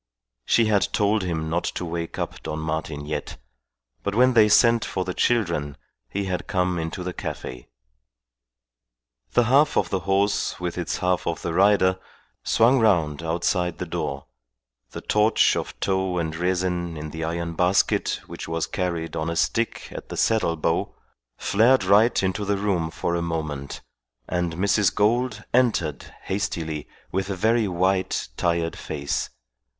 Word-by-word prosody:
She 115 - +4
had 105 -2 +2
told 105 +1 +2
him 80 -4 -2
not 85 +2 -1
to 90 - -3
wake 85 0 -4
up - - -4
Don 75 - -4
Martin 80 -2 -3
yet; 75 0 -4 0.6
but 100 - -2
when 125 +2 +5
they 110 -3 +6
sent 115 +1 +5
for 95 - -3
the 90 - -3
children 85 -13 0 0.3
he 100 - -2
had 95 -1 -3
come 90 -3 0
into 80 +3 -4
the 90 0 -4
cafe. 60 -7 -6 1.7
The 120 - +5
half 140 +6 +4
of - - +1
the 95 - +1
horse 100 +2 0
with 90 -1 -3
its 90 -2 -2
half 90 0 0
of 85 -1 -2
the 85 - -2
rider 95 -1 +4 0.4
swung 125 +4 +4
round 85 -10 +2
outside 85 +1 0
the 90 - -4
door; 70 -4 -4 0.6
the - - -8
torch 105 +1 +3
of - - -5
tow 95 -2 0
and 80 -2 -2
resin 90 -1 -1
in 75 0 -6
the 80 0 -5
iron 85 +1 -3
basket 90 +3 +1
which - - -8
was 80 0 -1
carried 85 -3 -3
on 80 +1 -2
a 85 - -2
stick 115 +7 -1
at - - -8
the - - -6
saddle 110 -7 +2
bow 75 - -1 0.4
flared 120 +5 +3
right 100 +4 +4
into 95 +2 -1
the 100 0 0
room 95 -5 0
for 85 - -2
a 85 - 0
moment, 75 -4 -4 0.5
and 90 -2 -1
Mrs. 100 +2 +2
Gould 120 +5 +1
entered 105 - +1
hastily 80 -6 -3 0.2
with 95 +1 -2
a 100 - -1
very 110 +3 +2
white, 95 -2 0
tired 85 +1 0
face. 70 -2 -3
90 Hz, 160 wpm, -24 LUFS, 80-100 Hz, 1.7 s, they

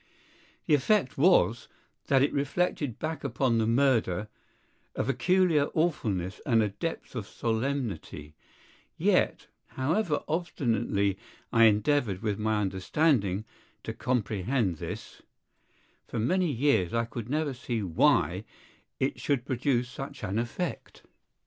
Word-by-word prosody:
The - - +2
effect 145 +1 +2
was, 135 - +3 0.4
that 135 -1 +4
it 145 - +1
reflected 145 -3 -1
back 160 0 -4
upon 125 -3 +1
the 110 - +1
murder 115 -6 +2 0.7
a - - 0
peculiar 165 +3 +2
awfulness 105 - -1
and 115 -5 +3
a 105 - 0
depth 150 +8 -5
of 110 -4 -4
solemnity; 110 - -3 0.6
yet, - - +2 0.3
however 155 +4 0
obstinately 115 - 0 0.3
I 115 0 +7
endeavored 110 -2 +2
with 105 -2 -1
my 110 0 +1
understanding 100 - +1 0.4
to - - -4
comprehend 110 - -1
this, - - -7 0.9
for - - -5
many 175 +9 +1
years 115 -8 +1
I 115 - +3 0.3
never 155 +4 0
could 125 - -15
see 115 -3 -2
why 85 -4 +2 0.6
it - - -1
should 130 -4 0
produce 125 -2 0
such 135 +1 -8
an 105 +1 -1
effect. 120 +10 -4
120 Hz, 120 wpm, -28 LUFS, 105-145 Hz, 0.9 s, I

